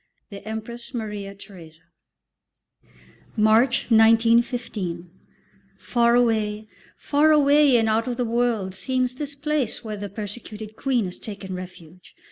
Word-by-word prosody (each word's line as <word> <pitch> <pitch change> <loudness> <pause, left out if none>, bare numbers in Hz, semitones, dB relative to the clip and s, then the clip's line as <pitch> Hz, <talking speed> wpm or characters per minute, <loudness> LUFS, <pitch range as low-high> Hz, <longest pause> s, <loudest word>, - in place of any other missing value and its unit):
THE 200 - -8
EMPRESS 235 +3 -7
MARIA 210 -3 -5
THERESA. 175 -6 -14 1.6
March, 225 +4 +3
1915. 225 -6 +2 0.7
Far 235 -1 +2
away, 215 -3 +1 0.3
far 300 +2 +2
away 290 -2 +5
and 225 -1 +2
out 220 +2 +1
of 245 -1 -3
the 250 - 0
world 230 -5 0
seems 255 +5 -1
this 285 +2 -6
place 290 -5 -1
where 215 -2 -5
the 205 0 -6
persecuted 215 +1 -8
Queen 250 -3 0
has 180 - -8
taken 200 -3 -8
refuge. 180 -1 -11
225 Hz, 120 wpm, -23 LUFS, 200-245 Hz, 1.6 s, away